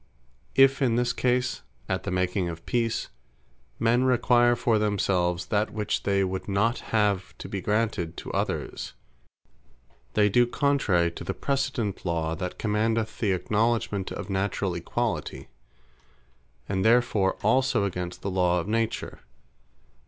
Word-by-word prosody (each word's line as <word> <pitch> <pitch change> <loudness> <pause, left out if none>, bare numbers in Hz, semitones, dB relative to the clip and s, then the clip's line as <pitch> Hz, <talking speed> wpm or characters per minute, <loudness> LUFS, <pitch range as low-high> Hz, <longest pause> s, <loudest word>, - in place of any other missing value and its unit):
If 135 +1 +5
in 120 -4 +3
this 120 +1 +1
case, 125 0 0 0.3
at - - -2
the - - -2
making 90 0 0
of 80 0 -8
Peace, 115 -2 -1 0.7
men 120 +2 +2
require 120 -1 +4
for 115 -2 +1
themselves, 90 -4 0
that 105 +1 +2
which 105 -1 -2
they 100 -1 +1
would 95 0 -3
not 105 +4 +1
have 105 -4 0
to - - -8
be 100 - -4
granted 105 -5 -1
to - - -6
others, - - -3 1.2
they 105 -1 +5
do 120 +4 +4
contrary 115 -12 +2
to - - -8
the - - -3
precedent 135 -7 -2
law, 80 -2 -1
that 90 +1 -5
commandeth 110 +1 0
the 100 -4 +2
acknowledgement 105 0 0
of - - -5
naturall 95 -1 -1
equalitie, 85 - -3 1.2
and 95 -1 -1
therefore 110 -4 +3
also 130 +1 +3
against 90 -2 -4
the 100 - -2
law 90 -1 +2
of 85 - -4
Nature. 115 +1 -2
105 Hz, 135 wpm, -26 LUFS, 95-120 Hz, 1.2 s, If